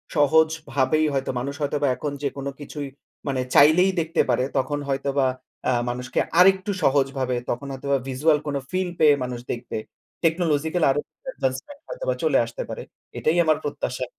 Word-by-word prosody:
সহজভাবেই 155 -1 +2
হয়তো 135 -1 -1
মানুষ 140 +3 -3
হয়তোবা 145 0 0
এখন 145 +4 -4
যেকোনো 140 0 -3
কিছুই 145 0 -6 0.4
মানে 130 -2 0
চাইলেই 170 +6 +6
দেখতে 165 +1 +1
পারে। 125 - +2
তখন 145 +2 0
হয়তোবা 140 0 0 0.4
আ - - +4 0.2
মানুষকে 125 +1 -2 0.2
আরেকটু 190 +2 +5
সহজভাবে 135 -2 +1
তখন 125 +4 -3
হয়তোবা 140 +1 0
visual 150 +4 +3
কোন 145 - -2 0.2
ফিল 185 0 0
পেয়ে 150 -2 +7
মানুষ 125 -1 -4
দেখবে। 120 -2 -5 0.5
Technological 160 0 +1
আরো 135 +2 +2 0.3
advancement 135 - -3
হয়তোবা - - -2
চলে - - +3
আসতে - - -7
পারে। 485 - -5 0.4
এটাই 160 +3 +1
আমার 155 -1 +3
প্রত্যাশা। 130 -3 -3
145 Hz, 150 wpm, -24 LUFS, 135-160 Hz, 0.5 s, পেয়ে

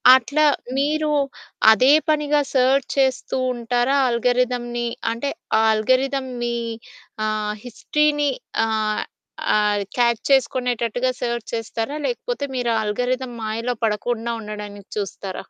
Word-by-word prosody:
అట్లా 280 +4 +1 0.3
మీరు 305 +2 +1 0.6
అదే 255 +5 +5 0.2
పనిగా 295 -1 +2
సెర్చ్ 260 +1 +3
చేస్తూ 265 -1 +1 0.2
ఉంటారా 245 +3 0
ఆల్గారిథమ్‌ని? 240 0 0 0.2
అంటే 235 +5 -2 0.3
ఆ - - +4
ఆల్గారిథం 260 +5 +1 0.2
మీ 240 0 -1 0.7
ఆహ్, 215 -1 -1
హిస్టరీని 295 +4 +1 0.4
ఆహ్, 215 -1 0 0.5
ఆహ్, 210 -1 +2 0.2
క్యాచ్ 235 -2 +2
చేసుకునేటట్టుగా 250 -2 +1
సెర్చ్ 235 -1 -2
చేస్తారా? 225 +4 -3
లేకపోతే 485 -8 -2
మీరు 245 -2 0
ఆ - - +2
ఆల్గారిథం 250 +4 -2
మాయలో 230 +3 -2
పడకుండా 230 +2 -1
ఉండడానికి 210 -2 -8
చూస్తారా? 195 -2 -5
245 Hz, 110 wpm, -22 LUFS, 220-265 Hz, 0.7 s, అదే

